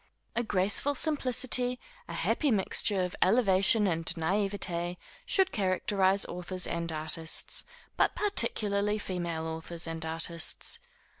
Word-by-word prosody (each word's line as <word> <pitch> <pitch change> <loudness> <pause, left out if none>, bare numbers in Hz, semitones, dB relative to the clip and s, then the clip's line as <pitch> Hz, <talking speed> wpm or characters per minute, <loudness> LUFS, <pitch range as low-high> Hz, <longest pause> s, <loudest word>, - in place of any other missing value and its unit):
A 235 - +1
graceful 210 +6 +2
simplicity, 255 -4 +1 0.3
a - - -7
happy 300 - 0
mixture 200 -2 +2
of 180 - -4
elevation 200 0 +3
and 165 -3 -1
naïveté, 175 +1 -1 0.3
should 385 -1 +2
characterise 190 0 +1
authors 180 +1 -3
and 170 0 -3
artists, 160 +1 -2 0.3
but - - +2
particularly 210 - +3
female 175 -5 -4
authors 160 +1 -3
and 165 -1 -3
artists. 165 +1 -2
190 Hz, 115 wpm, -29 LUFS, 170-215 Hz, 0.3 s, elevation